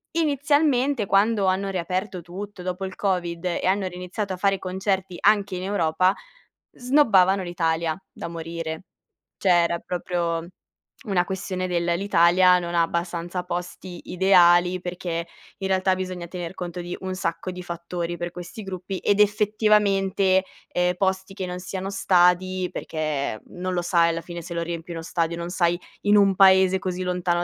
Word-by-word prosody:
inizialmente, 285 -5 +2
quando 200 0 +3
hanno 190 +1 +1
riaperto 185 +1 -3
tutto 190 +3 -8
dopo 185 +1 -3
il 190 - -7
Covid 180 -3 -2
e 180 - -1
hanno 190 0 +1
riniziato 180 +2 -4
a 185 - -5
fare 195 0 +1
concerti 190 -1 -2
anche 200 -2 +3
in 180 - -5
Europa, 185 -1 +2 0.6
snobbavano 215 -8 +4
l'Italia, 165 -2 -1
da - - -7
morire. 165 0 -5 0.5
Cioè 190 - 0
era 170 0 0
proprio 170 -2 -2 0.6
una 185 -4 +1
questione 185 0 -3
del: 175 -1 0
l'Italia 180 -1 +4
non 175 0 -4
ha 170 - +4
abbastanza 170 +1 -3
posti 180 0 -6
ideali, 180 -1 +5
perché, 175 -2 -4 0.3
in 190 - -2
realtà, 190 0 +2
bisogna 185 -2 -5
tener 175 -1 -6
conto 175 -1 -5
di 175 +1 -5
un 185 0 -3
sacco 170 +1 -3
di 180 - -7
fattori 170 0 -4
per 175 0 -4
questi 180 +5 -8
gruppi, 190 0 -5
ed 205 0 +1
effettivamente, 205 -2 +3 0.2
ehm, 180 0 +1
posti 190 0 -1
che 185 - -3
non 180 0 -5
siano 190 +1 -5
stadi, 185 -1 +2
perché 150 -8 -3
non 185 +1 -4
lo 175 - 0
sai, 170 -1 +3
alla 165 0 -2
fine, 170 0 -7
se 170 +1 -7
lo 170 - -2
riempi 170 0 -6
uno 165 -1 -5
stadio, 170 0 -1
non 170 +1 -5
sai, 175 -1 +1 0.2
in 205 0 +3
un 195 -1 +4
paese 190 0 +6
così 185 -1 -3
lontano 180 -1 0
180 Hz, 160 wpm, -24 LUFS, 175-195 Hz, 0.6 s, paese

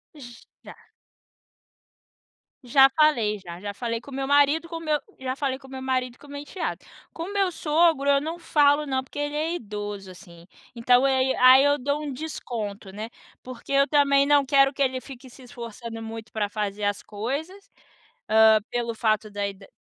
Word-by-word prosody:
J 240 -5 -13 0.2
já. - - -11 1.9
Já 270 +2 +6
falei 255 -9 +2
já, 175 -2 -10
já 205 0 -4
falei 230 +1 -4
com 280 - -14
o - - -10
meu 270 0 -3
marido 290 +3 +3
com 330 -1 -6
meu 305 -2 0 0.2
já 260 0 -3
falei 270 -2 -2
com 265 - -15
o - - -16
meu 265 0 -7
marido 255 -1 -2
com - - -17
o - - -16
meu 285 0 -7
enteado. 355 +5 -5 0.3
Com 330 - -6
o - - -7
meu 390 -2 +1
sogro 310 -3 +2
eu 280 0 +5
não 325 +3 -5
falo 295 -2 +3
não, 260 -1 -1
porque 290 - -9
ele 290 0 -2
é 320 +3 -1
idoso 205 - -6
assim, 175 -2 -15 0.3
então, 245 +3 +3
eh, 265 -1 +2
aí 265 0 +1
aí 255 +2 +7
eu 285 0 +3
dou 285 +3 -2
um 290 - -4
desconto, 220 -9 -6
né, 215 +3 -7 0.3
porque 255 +2 -10
eu 275 +1 +4
também 280 -1 +3
não 290 -1 +4
quero 275 0 +4
que 280 - -6
ele 260 -1 +1
fique 260 0 -12
se 255 +2 -16
esforçando 235 -1 -8
muito 225 0 -8
para 210 -2 -1
fazer 210 -1 -4
as 205 0 -1
coisas, 285 - -5 0.6
ah, 220 0 +6
pelo 235 -1 -2
fato 215 -1 0
da 205 0 -2
ida 195 0 -10
260 Hz, 195 wpm, -25 LUFS, 220-285 Hz, 1.9 s, aí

